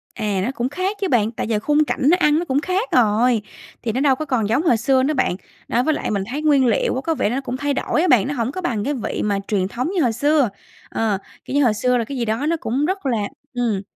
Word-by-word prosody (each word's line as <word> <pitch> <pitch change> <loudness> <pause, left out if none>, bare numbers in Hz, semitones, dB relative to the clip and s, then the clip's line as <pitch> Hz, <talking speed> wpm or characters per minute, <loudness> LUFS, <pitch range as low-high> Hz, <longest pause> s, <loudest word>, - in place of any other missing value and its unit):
À, 210 -4 -1
nó 245 - -1
cũng 250 -1 -2
khác 370 +7 -2
chứ 390 - +1
bạn. 225 - +2
Tại 230 - -4
giờ 220 -2 0
khung 295 +6 +2
cảnh - - -3
nó 355 - +5
ăn 300 -2 +3
nó 345 - -3
cũng 280 -2 0
khác 370 +8 -1
rồi, 230 0 +3 0.4
thì 230 - -1
nó 255 - -1
đâu 275 -2 +4
có 310 - -4
còn 245 -7 0
giống 255 +8 +2
hồi 245 -9 +3
xưa 260 +3 +2
nữa 295 +3 +1
bạn. 255 -10 +1 0.3
Đó, 245 - +1
với 315 - +2
lại - - -3
mình 200 -2 0
thấy 290 +3 -3
nguyên 290 -4 +4
liệu 235 0 +1
á, 260 - -2
có 325 +2 0
vẻ 205 - 0
nó 255 +4 -1
cũng 255 -1 -4
thay 285 +1 -1
đổi 305 - 0
á 365 - +2
bạn, 250 - +4
nó 285 - -2
hổng 240 -2 -1
có 370 - -5
bằng 230 - -1
cái 290 - -1
vị 255 - -3
mà 205 -1 +1
truyền 195 -3 0
thống 250 - -3
như 355 - +2
hồi 240 -3 +1
xưa. 285 +1 +2 0.4
Ờ, 215 -3 0 0.3
kiểu 265 - -4
như 290 - +4
hồi 235 -4 +3
xưa 250 +4 +1
là 235 - 0
cái 270 +4 -6
gì 240 - -1
đó 225 +6 -1
nó 330 +2 +1
cũng 265 +4 -1
rất 380 0 -2
là 250 -4 +1 0.4
ừm, 235 -6 0
255 Hz, 290 wpm, -21 LUFS, 225-295 Hz, 0.4 s, nó